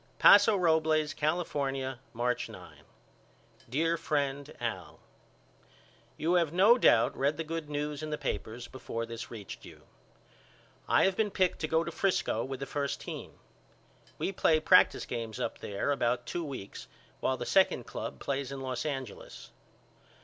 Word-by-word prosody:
Paso 205 Hz, +1 st, +7 dB
Robles, 160 Hz, -3 st, +2 dB
California, 140 Hz, -5 st, -1 dB
March 125 Hz, +1 st, -1 dB
9. -, -, -13 dB, 0.8 s
DEAR 165 Hz, +6 st, +1 dB
FRIEND 145 Hz, -3 st, -2 dB
AL: -, -, -4 dB, 1.2 s
You 165 Hz, +3 st, +1 dB
have 170 Hz, -4 st, +3 dB
no 205 Hz, +8 st, +6 dB
doubt -, -, +4 dB
read 140 Hz, +2 st, 0 dB
the 165 Hz, -, -2 dB
good 160 Hz, -1 st, -5 dB
news 150 Hz, 0 st, -3 dB
in 155 Hz, -, -4 dB
the 150 Hz, -, -2 dB
papers 120 Hz, -2 st, -4 dB
before 115 Hz, -3 st, -5 dB
this 115 Hz, 0 st, -7 dB
reached 110 Hz, -4 st, -9 dB
you. -, -, -13 dB, 1.1 s
I -, -, +5 dB
have 190 Hz, -1 st, +2 dB
been 215 Hz, 0 st, +1 dB
picked 185 Hz, -2 st, +1 dB
to 155 Hz, -, -1 dB
go 160 Hz, +1 st, +2 dB
to 170 Hz, -, -5 dB
Frisco 180 Hz, -, 0 dB
with 135 Hz, -1 st, -5 dB
the 135 Hz, -, -3 dB
first 140 Hz, 0 st, -2 dB
team. -, -, -7 dB, 0.8 s
We -, -, -1 dB
play 160 Hz, -4 st, +3 dB
practice 180 Hz, +4 st, +5 dB
games 115 Hz, -3 st, -5 dB
up -, -, -3 dB
there 100 Hz, +7 st, -2 dB
about 120 Hz, -3 st, 0 dB
two 175 Hz, -, -3 dB
weeks 130 Hz, -10 st, -7 dB, 0.3 s
while -, -, 0 dB
the -, -, -4 dB
second -, -, +3 dB
club -, -, -6 dB
plays 140 Hz, -1 st, -3 dB
in 135 Hz, -, -5 dB
Los 130 Hz, +2 st, -3 dB
Angeles. 135 Hz, -7 st, -6 dB
145 Hz, 155 wpm, -30 LUFS, 130-165 Hz, 1.2 s, Paso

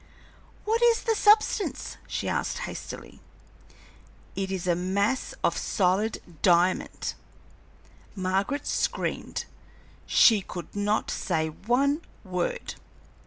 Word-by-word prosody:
"What 450 Hz, +2 st, +1 dB
is 470 Hz, -1 st, +4 dB
the 455 Hz, -, +2 dB
substance?" 425 Hz, 0 st, +2 dB
she -, -, -3 dB
asked, -, -, -1 dB
hastily. -, -, -8 dB, 1.2 s
"It 195 Hz, -1 st, -2 dB
is 185 Hz, -2 st, -3 dB
a 175 Hz, -, +3 dB
mass 200 Hz, -, 0 dB
of -, -, +2 dB
solid 200 Hz, +3 st, +1 dB, 0.2 s
diamond!" 180 Hz, +1 st, +2 dB, 1.0 s
Margaret 195 Hz, +9 st, -1 dB
screamed. -, -, -2 dB, 0.6 s
She 220 Hz, -4 st, +6 dB
could 180 Hz, 0 st, -8 dB
not 205 Hz, +1 st, 0 dB
say 160 Hz, -4 st, -1 dB
one 260 Hz, -, +1 dB, 0.2 s
word. 180 Hz, -3 st, -2 dB
200 Hz, 100 wpm, -27 LUFS, 185-280 Hz, 1.2 s, She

